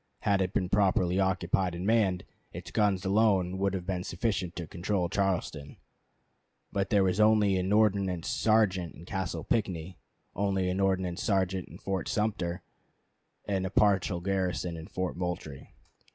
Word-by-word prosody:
Had 100 Hz, -1 st, +2 dB
it 90 Hz, -1 st, 0 dB
been 95 Hz, -3 st, 0 dB
properly 95 Hz, -1 st, +2 dB
occupied 95 Hz, -1 st, +1 dB
and 90 Hz, +2 st, -4 dB
manned, 100 Hz, -5 st, +2 dB, 0.3 s
its -, -, -8 dB
guns 100 Hz, -3 st, +1 dB
alone 95 Hz, -3 st, +2 dB
would 100 Hz, 0 st, +1 dB
have 90 Hz, -2 st, -4 dB
been 90 Hz, -1 st, -2 dB
sufficient 95 Hz, -2 st, -2 dB
to 85 Hz, -, -4 dB
control 90 Hz, +2 st, -2 dB
Charleston. 90 Hz, -7 st, -2 dB, 0.9 s
But 100 Hz, -1 st, -1 dB
there 100 Hz, -2 st, +4 dB
was 95 Hz, +1 st, +1 dB
only 105 Hz, -2 st, +4 dB
an 95 Hz, +1 st, -1 dB
ordnance 100 Hz, -5 st, +2 dB
sergeant 100 Hz, -6 st, +2 dB
in 85 Hz, -, -12 dB
Castle 90 Hz, -4 st, -3 dB
Pinckney, 90 Hz, -6 st, -2 dB, 0.4 s
only 95 Hz, -2 st, 0 dB
an 95 Hz, -, -2 dB
ordnance 95 Hz, -1 st, 0 dB
sergeant 95 Hz, -4 st, 0 dB
in -, -, -11 dB
Fort 95 Hz, -2 st, -3 dB
Sumter, 95 Hz, -5 st, -1 dB, 0.8 s
and 95 Hz, -2 st, -1 dB
a 95 Hz, -, -2 dB
partial 100 Hz, -3 st, +2 dB
garrison 90 Hz, -2 st, -1 dB
in 80 Hz, 0 st, -8 dB
Fort 95 Hz, -3 st, -3 dB
Moultrie. 90 Hz, -6 st, -5 dB
95 Hz, 150 wpm, -29 LUFS, 90-100 Hz, 0.9 s, there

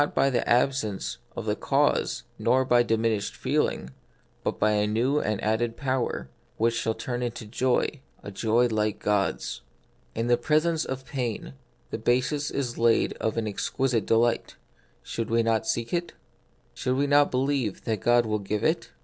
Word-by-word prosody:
43 145 Hz, -, -1 dB
by 135 Hz, -, +4 dB
the 120 Hz, -2 st, 0 dB
absence 120 Hz, -5 st, +1 dB, 0.2 s
of -, -, -5 dB
the -, -, 0 dB
cause -, -, +1 dB, 0.2 s
nor 130 Hz, +3 st, +3 dB
by 120 Hz, -1 st, +4 dB
diminished 115 Hz, -3 st, 0 dB
feeling, 65 Hz, -, -1 dB, 0.5 s
but -, -, -1 dB
by 110 Hz, -, +3 dB
a 105 Hz, 0 st, +2 dB
new 125 Hz, +7 st, +1 dB
and 105 Hz, -5 st, -1 dB
added 115 Hz, +2 st, 0 dB
power, 130 Hz, -, -1 dB, 0.3 s
which 115 Hz, +1 st, +2 dB
shall 115 Hz, -1 st, -1 dB
turn 120 Hz, -1 st, -4 dB
it -, -, 0 dB
into 115 Hz, -1 st, -7 dB
joy 125 Hz, +5 st, 0 dB
— -, -, -33 dB
a 100 Hz, -, -7 dB
joy 115 Hz, +4 st, +2 dB
like 110 Hz, -3 st, 0 dB
God's. 105 Hz, -2 st, -1 dB, 0.5 s
In 115 Hz, -, -1 dB
the 120 Hz, 0 st, +3 dB
presence 155 Hz, +5 st, +1 dB
of 130 Hz, 0 st, -5 dB
pain 125 Hz, -5 st, -4 dB, 0.4 s
the -, -, -3 dB
basis 130 Hz, +6 st, +1 dB
is 125 Hz, -4 st, -3 dB
laid 115 Hz, -1 st, +3 dB
of 110 Hz, -, -2 dB
an 110 Hz, -1 st, 0 dB
exquisite 115 Hz, +2 st, -1 dB
delight; 115 Hz, +1 st, +2 dB, 0.5 s
should 115 Hz, -1 st, -4 dB
we 115 Hz, 0 st, +3 dB
not 115 Hz, +6 st, +1 dB
seek 120 Hz, -6 st, -1 dB
it? 175 Hz, 0 st, -1 dB, 0.6 s
Should 130 Hz, 0 st, -1 dB
we 140 Hz, +2 st, +2 dB
not 145 Hz, 0 st, +4 dB
believe 130 Hz, -5 st, -1 dB
that 110 Hz, -4 st, -2 dB
God 120 Hz, 0 st, +4 dB
will 105 Hz, -1 st, -1 dB
give 100 Hz, +1 st, -3 dB
it -, -, +1 dB
120 Hz, 175 wpm, -26 LUFS, 110-130 Hz, 0.6 s, by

